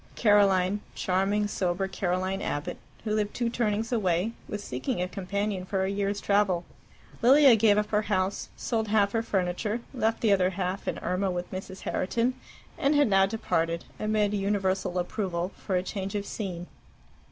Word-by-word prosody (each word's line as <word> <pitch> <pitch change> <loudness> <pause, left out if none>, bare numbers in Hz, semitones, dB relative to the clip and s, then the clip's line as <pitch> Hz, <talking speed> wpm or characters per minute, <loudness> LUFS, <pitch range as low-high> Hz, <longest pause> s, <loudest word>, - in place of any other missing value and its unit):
Caroline, 200 -2 +4 0.2
charming, 195 +3 +1
sober, 190 -1 -1
Caroline 190 0 -1
Abbott, 145 0 -3 0.3
who 215 -1 -1
lived 210 -1 -1
two 235 -1 0
turnings 225 -1 -1
away, 190 -2 +1 0.2
was 205 0 -5
seeking 130 +4 -3
a 180 - 0
companion 200 +1 -2
for 190 +1 -1
a 190 - 0
year's 200 0 -1
travel. 200 -4 +2 0.6
Lilia 265 +1 +7
gave 210 -1 +4
up 210 0 0
her 210 0 +3
house, 195 -2 -1
sold 225 -2 -1
half 205 -1 +3
her 225 - +1
furniture, 205 +2 -1
left 225 -3 0
the 220 - +3
other 185 -2 +3
half 185 +1 -3
and - - -1
Irma 185 +2 0
with 180 -1 -4
Mrs. 190 0 -7
Herriton, 235 +6 0 0.5
and 280 +2 +3
had 290 -5 +4
now 195 -1 +5
departed, 170 -6 -1
amid 215 -1 +1
universal 195 -2 0
approval, 180 -1 -2
for 190 - -3
a 180 - +1
change 195 +1 -4
of 205 -1 -2
scene. 180 -5 -5
200 Hz, 165 wpm, -28 LUFS, 185-210 Hz, 0.6 s, Lilia